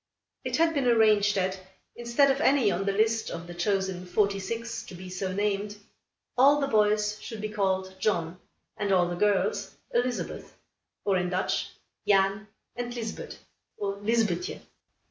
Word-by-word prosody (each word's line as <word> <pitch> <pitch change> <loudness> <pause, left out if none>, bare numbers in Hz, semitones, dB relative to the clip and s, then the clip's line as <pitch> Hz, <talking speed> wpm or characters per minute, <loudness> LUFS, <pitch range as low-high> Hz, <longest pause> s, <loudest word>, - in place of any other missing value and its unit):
It - - -1
had 330 0 +3
been 275 -4 +1
arranged 215 -3 +4
that, 190 0 0 0.4
instead 240 +4 +3
of 270 +2 -1
any 265 -9 +4
on 190 +3 -1
the 200 - +2
list 220 +2 +1
of 170 0 -6
the 175 - -8
chosen 190 0 -1
forty 200 +1 +1
six, 230 +4 -4
to 185 - -9
be 180 +1 -9
so 185 +1 -3
named, 205 +1 -1 0.6
all 280 +3 +6
the 280 - +1
boys 210 -3 +2
should 225 - -7
be 215 +1 -3
called 190 -2 -1
John, 175 -4 0 0.4
and 205 -1 -1
all 180 -2 +4
the 175 - -3
girls 200 0 +1 0.2
Elizabeth; 245 +1 -2 0.5
or, 195 -2 +3
in 180 0 0
Dutch, 185 +1 -1 0.4
Jan 195 +1 +3 0.3
and 245 0 -4
Lisbet, 225 -2 -6 0.4
or 200 -1 -3
Lizbethje. 225 - 0
205 Hz, 160 wpm, -28 LUFS, 190-230 Hz, 0.6 s, all